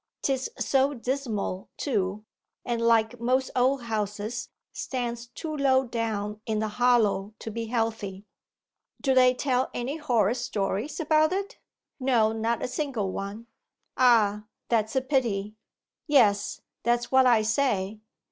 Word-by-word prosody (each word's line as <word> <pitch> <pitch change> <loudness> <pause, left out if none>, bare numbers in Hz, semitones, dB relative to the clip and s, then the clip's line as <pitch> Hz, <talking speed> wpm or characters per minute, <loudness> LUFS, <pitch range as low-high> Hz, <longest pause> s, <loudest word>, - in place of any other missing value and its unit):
'Tis 265 -1 0
so 275 +1 +2
dismal, 230 -7 -3
too, 210 -5 -1 0.4
and 235 -1 -1
like 230 0 +3
most 255 +3 +1
old 255 +1 +2
houses 215 0 -3 0.2
stands 240 -2 -4
too 310 +6 -6
low 265 -2 +3
down 215 -3 -3
in 220 -1 0
the 220 +1 0
hollow 215 -3 +2
to 225 - -7
be 230 +1 -4
healthy.' 220 -4 -2 0.7
'Do 270 - +1
they 255 -1 +5
tell 255 -1 0
any 260 +6 -3
horrid 240 -7 +1
stories 230 - -2
about 310 0 +3
it?' 395 +5 -3 0.4
'No, 240 -5 +3
not 225 +1 -1
a - - 0
single 250 -7 -2
one.' 200 +4 -5 0.5
'Ah, 215 -4 +4 0.2
that's 220 -1 +1
a 265 - +3
pity.' 230 -7 0 0.5
'Yes, 210 -9 +3 0.2
that's 240 +1 0
what 260 -1 +6
I 230 -3 +5
say. 215 -3 0
235 Hz, 135 wpm, -27 LUFS, 215-260 Hz, 0.7 s, what